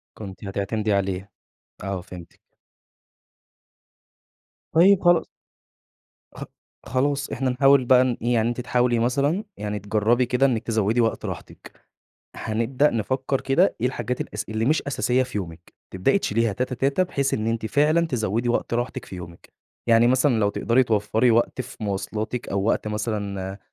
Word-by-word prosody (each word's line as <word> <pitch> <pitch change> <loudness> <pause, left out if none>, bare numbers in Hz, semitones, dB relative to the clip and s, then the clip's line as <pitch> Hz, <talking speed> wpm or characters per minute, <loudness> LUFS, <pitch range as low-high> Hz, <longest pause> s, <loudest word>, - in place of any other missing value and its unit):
كنتِ 100 -2 -9
هتعتمدي 100 +2 -2
عليه، 95 0 -1 0.5
آه 95 -1 -3
فهمتِك. 90 -1 -12 2.3
طيب 185 +4 +5
خلاص 175 -1 +5 1.1
خ - - -7 0.4
خلاص 140 +2 0
إحنا 130 0 -1
نحاول 135 +1 +4
بقى 125 +1 +5
نإيه، 120 -1 -1
يعني 115 0 +2
أنتِ 120 +1 -3
تحاولي 125 -1 +1
مثلًا 140 - +1
يعني 105 0 -4
تجربي 110 +5 +1
كده 125 +3 +2
إنِّك 120 -4 0
تزوّدي 110 0 +1
وقت 115 -1 0
راحتِك، - - -8 0.6
هنبدأ 115 +6 0
نفكر 130 +4 -1
كده 155 +9 +2
إيه 125 - +2
الحاجات 125 -1 -3
الأس 105 - -4
اللي 110 +1 -1
مش 150 +5 +2
أساسية 130 -2 +1
في 125 -4 -4
يومِك، 85 -3 -8 0.2
تبدأي 95 - +1
تشيليها 115 - 0
تاته 125 +4 -2
تاته، 140 +8 +1
بحيث 140 -6 -1
إن 110 0 -2
أنتِ 115 -1 -1
فعلًا 155 +6 +2
تزوّدي 115 -3 -1
وقت 120 - -1
راحتِك 120 +1 -3
في 95 - -9
يومِك، 85 -1 -11 0.4
يعني 115 +1 +5
مثلًا 130 +1 +3
لو 100 - +3
تقدري 120 +5 +2
توفري 110 +1 +1
وقت 120 +3 +1
في 130 +2 -7
مواصلاتِك، 105 +4 -3
أو 100 0 -1
وقت 110 0 0
مثلًا 100 -3 -3
115 Hz, 150 wpm, -24 LUFS, 105-130 Hz, 2.3 s, طيب